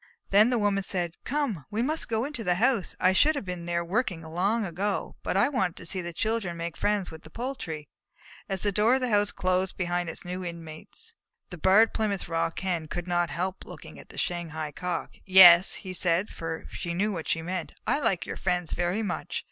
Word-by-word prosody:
Then 210 +4 +6
the 250 - +2
Woman 205 -2 +1
said: 175 -3 -2
"Come, 255 - -1
we 220 +3 -1
must 310 +5 0
go 225 +1 0
into 280 -5 -5
the 180 -3 +2
house! 230 0 +1
I 185 - +4
should 305 +10 +4
have 280 - -4
been 180 -2 -5
there 170 0 -1
working 190 -3 -1
long 195 +8 0
ago, 195 +3 -2
but - - -1
I 240 - +4
wanted 250 - 0
to - - -10
see 185 +2 -1
the 175 0 -5
children 205 -1 -2
make 170 0 -4
friends 205 -3 0
with 160 -1 -10
the 155 - -13
poultry." 180 - -5 0.6
As 190 -2 -1
the 205 - +3
door 215 +5 +3
of 265 - -1
the 250 -2 0
house 205 -1 +3
closed 185 -1 0
behind 175 -1 -1
its 165 - -7
new 180 +1 -4
inmates, 170 - -9 0.4
the 180 - -6
Barred 205 +6 +5
Plymouth 205 -3 -1
Rock 165 -1 -1
Hen 175 -4 -1
could 175 +2 -4
not 175 -1 +1
help 180 +6 -3
looking - - -11
at - - -13
the - - -13
Shanghai 160 -3 -3
Cock. 180 +2 -4
"Yes," 185 -2 +8
he 185 -2 -6
said, 180 +2 +1
for 165 -1 -5
he 170 -1 -3
knew 205 +4 +1
what 165 -5 -5
she 165 - 0
meant, 180 -1 -4
"I - - +1
like 190 - 0
your - - -5
friends 180 -2 -1
very 175 +5 0
much. 205 - -3
185 Hz, 215 wpm, -27 LUFS, 170-210 Hz, 0.6 s, Yes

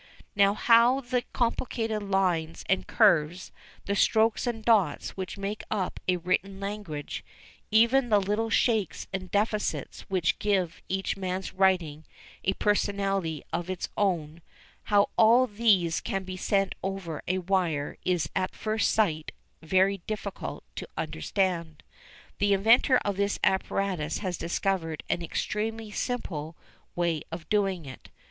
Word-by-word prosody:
Now 200 0 +4
how 235 +4 +5
the 250 -1 -1
complicated 230 -2 -1
lines 185 -5 0
and 190 - +1
curves, 175 -5 +3 0.3
the 200 - -1
strokes 220 +3 +3
and 225 -2 -3
dots 210 -9 +2
which 190 +1 -6
make 200 +2 -4
up 195 -4 -2
a 180 -1 +3
written 185 +3 -1
language, 195 -7 -5 0.5
even 235 +4 +4
the 210 -2 +5
little 210 +3 -1
shakes 220 -7 +1
and 185 -1 -4
defects 210 +1 -1
which 185 -2 +1
give 190 -5 0
each 190 +1 -1
man's 185 0 -3
writing 180 -6 +1 0.4
a 195 - +2
personality 195 -6 0
of 175 +2 -2
its 185 -1 -3
own, 170 -5 -1 0.4
how 205 -1 +3
all 235 +3 +6
these 205 -7 +2
can 195 -1 -2
be 185 0 -6
sent 195 +1 +1
over 190 -5 -4
a 185 - +1
wire 175 -6 0
is 175 -4 +1
at 185 -1 -1
first 220 0 0
sight 160 -8 +1 0.3
very 190 +4 +2
difficult 210 -2 -5
to - - -5
understand. 170 -5 -2 0.6
The 205 0 +3
inventor 230 +6 +5
of 200 -2 -1
this 200 0 0
apparatus 190 -4 0
has 185 -3 -3
discovered 170 -2 -2
an 175 - 0
extremely 215 +5 -3
simple 165 - -4 0.4
way 170 -3 0
of 165 -1 -7
doing 195 -5 +1
it. 130 -1 -11
195 Hz, 135 wpm, -28 LUFS, 175-210 Hz, 0.6 s, all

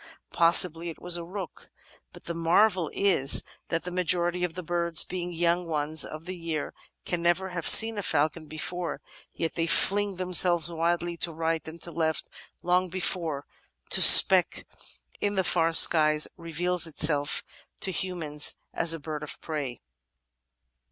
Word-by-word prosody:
Possibly 170 0 +3
it 165 - -11
was 175 -1 -1
a 170 - -5
rook. 185 +1 -10 0.4
But - - -16
the 170 - -7
marvel 170 +1 0
is 180 -9 0 0.2
that 165 -1 -4
the 180 - -8
majority 180 0 -2
of 175 -2 -4
the 180 - -8
birds, 170 0 +2
being 180 -1 -7
yoimg 175 +1 -2
ones 155 -1 -1
of 155 +1 -9
the 185 0 -8
year, 165 -3 -6 0.3
can 175 -1 -4
never 175 +2 -1
have 175 -3 -2
seen 225 -1 +9
a - - -3
falcon 155 -1 -2
before; 170 +3 -6 0.3
yet 165 - -5
they 165 -1 -3
fling 200 +3 +1
themselves 175 -2 +2
wildly 170 +1 -3
to 170 - -5
right 160 0 -4
and 160 +1 -11
to 170 - -4
left 160 -1 -4 0.3
long 180 +1 -1
before 170 -5 -4 0.5
the - - +6
speck - - +7 0.5
in 205 0 -3
the 190 - -1
far 165 -2 0
skies 155 -2 +3
reveals 170 +1 -4
itself 150 -2 0 0.4
to 190 - -3
human 175 -5 -5
eyes 150 - +4 0.2
as 165 0 0
a - - -10
bird 150 0 -8
of 150 - -8
prey." 145 -7 -7
170 Hz, 160 wpm, -25 LUFS, 160-180 Hz, 0.5 s, seen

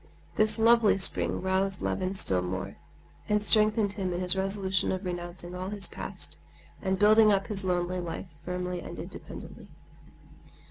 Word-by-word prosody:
This 215 +1 +2
lovely 225 -2 +4
spring 190 -1 +4
roused 190 0 0
Levin 185 +1 -2
still 95 - +2
more, 90 +1 -5 0.5
and 210 0 +2
strengthened 215 -1 +3
him 190 -2 -3
in 175 - -3
his 180 0 +3
resolution 190 -1 0
of 185 +1 -4
renouncing 175 0 -5
all 185 +1 -5
his 205 -1 0
past - - -3 0.4
and 190 -1 0
building 215 +2 +6
up 195 -1 +1
his 205 -2 -3
lonely 180 0 -1
life 175 0 -5 0.2
firmly 180 0 -3
and - - -9
independently. - - -9
190 Hz, 150 wpm, -28 LUFS, 180-205 Hz, 0.5 s, building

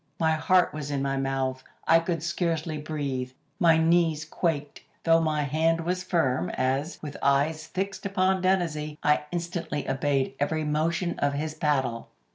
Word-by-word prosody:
My 160 -1 +3
heart 175 +3 +3
was 150 -2 -5
in 140 -1 -1
my 135 0 0
mouth. 135 -1 -1 0.2
I 165 +1 +7
could 165 -1 -2
scarcely 165 -2 -1
breathe. 140 -4 -3 0.3
My 165 -4 +5
knees 160 -1 +2
quaked, 150 -3 -2 0.2
though 165 0 +5
my 155 -2 +1
hand 160 +4 +1
was 180 +2 -2
firm, 135 -9 +1
as, 135 +5 -1
with 145 -2 -6
eyes 145 +3 +1
fixed 195 +3 -3
upon 190 -1 +1
Dennazee, 165 -5 0
I 150 0 +3
instantly 170 -4 -3
obeyed 135 0 0
every 155 +2 0
motion 165 +4 0
of 145 0 +1
his 155 +2 -2
paddle. 135 -7 -1
155 Hz, 155 wpm, -27 LUFS, 145-170 Hz, 0.3 s, I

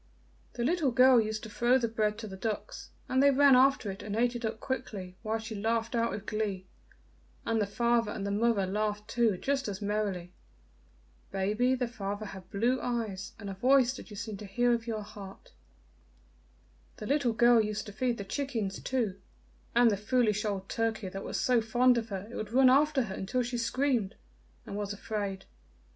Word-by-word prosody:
The 240 - -3
little 315 +1 +2
girl 250 0 +6
used 215 0 -3
to 220 - -7
throw 240 +4 +3
the 240 -3 0
bread 215 -2 0
to 225 -1 -6
the 190 - -8
ducks, 210 +2 -5 0.2
and 260 +1 +2
they 280 - +6
ran 280 -1 +6
after 260 -5 +4
it 195 - -9
and 205 0 -4
ate 240 +2 +1
it 240 - -5
up 220 0 -3
quickly, 210 -9 -5
while 220 0 -1
she 220 0 -7
laughed 225 +2 -1
out 235 -1 +1
with 205 0 -5
glee, 205 -3 -2 0.8
and 225 -1 +1
the 205 - 0
father 235 +1 +1
and 200 - -4
the 200 - -2
mother 210 -1 +2
laughed 210 +2 -2
too 230 -4 +1
just 270 +4 -1
as 200 -2 -4
merrily. 200 -4 -2 1.0
Baby, 210 +7 +1
the 250 -1 -1
father 205 -2 -5
had 190 -2 -10
blue 235 +5 +1
eyes, 220 -6 -3
and 205 - -8
a 195 - -4
voice 255 +5 +3
that - - -10
you 210 - -9
seemed 210 -1 -6
to 210 - -7
hear 240 +5 +2
with 235 0 0
your 215 -2 -3
heart. 200 -2 -11 1.5
"The - - -7
little 270 -2 +1
girl 235 0 +5
used 210 0 -3
to 205 - -8
feed 245 +2 -1
the 200 - -5
chickens 220 -3 -3
too, 225 -7 -2 0.6
and 240 -1 +6
the 200 - 0
foolish 215 0 +1
old 195 -2 -2
turkey 220 -3 -2
that 195 +1 -6
was - - -3
so 250 -2 +3
fond 240 +2 +3
of 225 - -7
her 195 0 -5
it - - -8
would 215 0 -5
run 260 0 +6
after 285 0 +4
her 200 -5 -6
until 195 +7 -1
she 240 0 -3
screamed 240 -4 0 0.5
and - - -7
was 205 0 -3
afraid. 205 -2 -4
220 Hz, 200 wpm, -30 LUFS, 205-245 Hz, 1.5 s, girl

